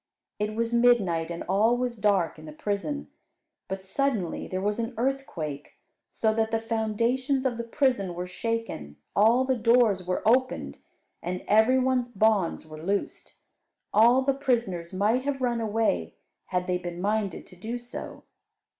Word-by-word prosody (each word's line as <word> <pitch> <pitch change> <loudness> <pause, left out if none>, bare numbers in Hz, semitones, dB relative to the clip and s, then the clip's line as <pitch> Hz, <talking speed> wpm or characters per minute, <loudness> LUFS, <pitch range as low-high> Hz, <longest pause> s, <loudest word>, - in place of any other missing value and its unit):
It 210 +1 -2
was 230 +1 -1
midnight, 205 -9 +3
and 170 0 -5
all 215 +6 +3
was 245 -1 -2
dark 200 -7 +1
in 155 - -11
the - - -7
prison. 205 - -3 0.6
But 190 0 -5
suddenly 215 -4 -1
there 185 - -3
was 205 +3 -1
an 230 +1 -3
earthquake; 230 - -3 0.4
so 220 -1 +1
that 220 0 +1
the 225 0 0
foundations 230 +5 0
of 255 -2 +1
the 235 - -3
prison 230 -7 0
were 180 +1 -3
shaken, 225 - -4 0.2
all 230 +5 +5
the 260 0 +1
doors 230 -4 +3
were 180 +3 -2
opened, 255 +3 +1 0.4
and 180 +1 -4
every 220 +5 +5
one's 255 -1 +1
bonds 210 -7 +1
were 155 0 -10
loosed. 200 +4 -3 0.6
All 240 +5 +6
the 275 +1 +2
prisoners 230 -11 -1
might 210 +7 +1
have 280 -1 -2
run 240 -2 0
away 215 - 0 0.3
had 180 -1 -1
they 180 0 0
been 175 -1 -6
minded 205 -1 -1
to - - -16
do 220 +7 -4
so. 240 0 -8
220 Hz, 160 wpm, -27 LUFS, 185-245 Hz, 0.6 s, All